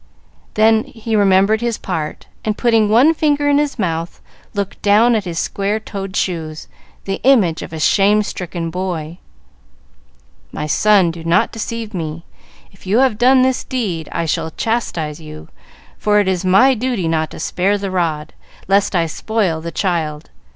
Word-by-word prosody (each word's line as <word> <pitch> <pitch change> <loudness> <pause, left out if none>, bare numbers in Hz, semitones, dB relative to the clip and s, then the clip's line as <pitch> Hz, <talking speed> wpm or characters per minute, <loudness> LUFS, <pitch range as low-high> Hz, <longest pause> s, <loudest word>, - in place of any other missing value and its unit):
Then 220 +1 +4
he 225 -1 -4
remembered 200 +2 +3
his 235 -2 -1
part, 160 -5 -5 0.2
and, 215 -1 -2
putting 225 -3 +3
one 250 +9 +5
finger 295 -2 +1
in 290 0 +4
his 295 -2 -1
mouth, 170 -4 -3 0.4
looked 200 -1 -4
down 215 +4 +4
at 215 -3 0
his 170 -2 -5
square 200 +5 -1
toed 195 -3 -7
shoes, 160 -4 -3 0.4
the 195 0 -3
image 215 -12 +3
of - - -8
a 160 - -6
shame 205 +6 +3
stricken 175 -4 -5
boy. 175 -2 -4 1.3
"My 150 - -4
son, 190 +3 +3
do 165 0 -9
not 165 +1 +2
deceive 225 0 -5
me. 165 -2 -5 0.5
If 190 -1 -17
you 205 +4 +2
have 255 -4 +2
done 255 +1 +5
this 260 0 0
deed 190 - -3
I 170 - -2
shall 160 0 -1
chastise 165 -7 -3
you, 75 0 -11 0.5
for 210 0 +2
it 205 - +1
is 190 -1 0
my 195 +9 +5
duty 240 -7 -2
not 160 -1 0
to - - -10
spare 195 +3 0
the 195 -1 -4
rod, 160 -4 -2 0.3
lest 195 0 +2
I 170 -2 +2
spoil 180 -1 -1
the 170 +1 -6
child. 160 -5 -2
195 Hz, 165 wpm, -18 LUFS, 165-220 Hz, 1.3 s, one